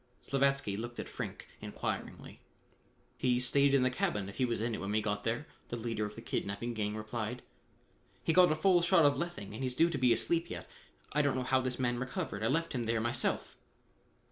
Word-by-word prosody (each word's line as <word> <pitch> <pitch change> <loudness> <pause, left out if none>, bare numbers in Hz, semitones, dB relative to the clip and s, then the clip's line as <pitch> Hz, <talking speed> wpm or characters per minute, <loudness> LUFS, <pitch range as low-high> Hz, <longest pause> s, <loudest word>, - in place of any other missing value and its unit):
Slavatsky 135 -6 +1
looked 120 +2 -6
at - - -4
Frink - - -6
inquiringly. - - -5 0.8
"He 125 -1 +2
stayed 140 +2 +4
in 135 - +4
the 130 - +2
cabin 105 -5 -1
if 100 - -10
he 130 - +3
was 120 -3 -1
in 115 +1 -1
it - - -3
when 95 - -3
we 105 +1 +2
got 105 -1 -2
there," 120 +6 -1 0.2
the 120 - -3
leader 115 -2 -2
of 105 - -11
the 115 - -9
kidnapping 110 +2 -2
gang 105 -1 -1
replied. 110 +2 -4 0.8
"He 165 - +2
got 180 -1 +7
a - - +3
full 175 +2 +4
shot 170 -2 +5
of 145 0 +5
lethane 170 - -4
and 110 - -6
he's 130 -1 -1
due 165 +4 +4
to 145 - -2
be 125 -1 +4
asleep 140 +10 +1
yet. - - -6 0.5
I 150 - +4
don't 140 -2 +1
know 130 - -1
how 130 +1 +2
this 130 -1 -2
man 120 -2 0
recovered. 125 -6 -3
I 110 - +1
left 165 +6 0
him 120 -3 -1
there 115 0 +1
myself." 120 +2 -1
125 Hz, 220 wpm, -33 LUFS, 110-140 Hz, 0.8 s, got